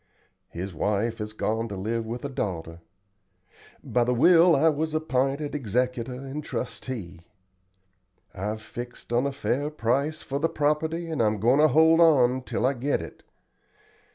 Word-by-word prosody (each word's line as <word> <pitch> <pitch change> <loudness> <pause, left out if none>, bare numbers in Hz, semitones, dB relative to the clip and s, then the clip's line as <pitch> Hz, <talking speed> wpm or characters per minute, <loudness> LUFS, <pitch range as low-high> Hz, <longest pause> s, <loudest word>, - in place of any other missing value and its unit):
His 90 +2 -6
wife 105 +7 -1
has 105 0 -4
gone 110 +1 -2
to 100 - -6
live 110 +4 -3
with 120 +4 -5
a - - -3
daughter. 85 -9 -4 1.0
By 120 - +1
the 125 +1 0
will 170 +6 +6
I 150 +4 +3
was 155 0 0
app'inted 140 -1 -1
executor 125 -1 -1
and 135 +3 -6
trustee. 105 -11 -6 1.1
I've 105 +3 -4
fixed 120 0 -8
on 125 +4 +2
a - - -2
fair 140 +1 -1
price 140 +3 -1
for 140 +1 -3
the 165 +3 +1
property, 155 +3 -1
and 160 -6 -2
I'm 105 -1 +1
goin' 120 +7 +3
to 155 - +6
hold 160 +3 +5
on 130 -6 +5
till 125 - -2
I 135 - +3
get 135 +3 -1
it. 80 - -10
125 Hz, 155 wpm, -26 LUFS, 110-150 Hz, 1.1 s, will